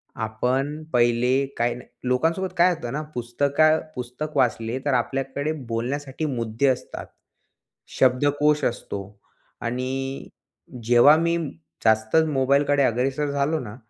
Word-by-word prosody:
आपण 130 +7 -2
पहिले 120 +3 +3
काय 120 0 +1
न 125 - -9 0.3
लोकांसोबत 165 +9 +1
काय 175 +2 +6
होतं 120 -8 -6
ना 150 - -2
पुस्तका 140 +6 +2 0.2
पुस्तक 125 +5 -6
वाचले 120 0 +1
तर 140 - +1
आपल्याकडे 135 +3 -1 0.2
बोलण्यासाठी 135 +6 -3
मुद्दे 120 -1 -1
असतात. 130 - -2 0.9
शब्दकोश 145 +3 +3
असतो 100 -4 -3 0.6
आणि 130 +3 -3 0.6
जेव्हा 120 +6 +6
मी 170 +1 +1 0.5
जास्तच 110 +8 +3
मोबाईलकडे 140 +1 +2
अग्रेसर 135 +4 0
झालो 145 +3 0
ना 105 -4 -8
135 Hz, 110 wpm, -24 LUFS, 120-145 Hz, 0.9 s, काय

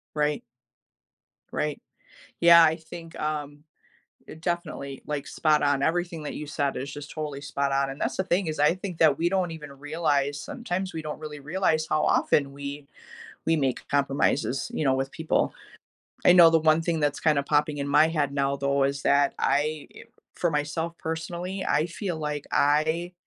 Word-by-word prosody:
Right. 150 0 0 1.1
Right. 150 -1 -2 0.6
Yeah, 170 0 +8
I 160 0 +3
think, 165 0 -11
um, 150 -1 -4 0.6
it 160 - -10
definitely, 160 -6 -4
like, 150 -2 -3
spot-on, 145 -3 +2
everything 170 0 -1
that 150 - -5
you 150 - -5
said 140 -2 -1
is 140 +3 -5
just 145 +1 -8
totally 150 -3 -5
spot-on, 140 -1 0
and 135 +2 -7
that's - - -2
the 190 - +1
thing 185 +1 0
is, 155 -1 -3
I 150 +4 +4
think 185 -2 -7
that 150 -4 +5
we 170 +1 +1
don't 185 -2 0
even 150 -3 -8
realize 145 -1 -1
sometimes 190 - -4
we 160 - -4
don't 155 -1 -6
really 150 -1 -7
realize 155 +1 0
how 155 - +1
often 140 -2 +2
we 140 +1 -7 0.6
we 165 0 +3
make 135 -4 -1
compromises, 140 -1 0
you 155 - -1
know, 135 -2 +3
with 135 0 -2
people. 160 -1 0 0.7
I - - +8
know 175 -2 +8
the 165 - +4
one 155 0 +3
thing 165 -1 -1
that's 145 -1 0
kinda 150 -3 +2
popping 150 +1 +1
in 140 - -2
my 155 +3 +5
head 150 -4 -1
now, 140 0 0
though, 140 0 +1
is 140 0 -1
that 140 0 +3
I, 150 +1 0 0.5
for 175 - 0
myself 160 +3 -2
personally, 175 +4 -4
I 155 - +2
feel 175 0 -4
like 150 -1 -4
I 160 +4 +2
150 Hz, 175 wpm, -26 LUFS, 140-165 Hz, 1.1 s, Yeah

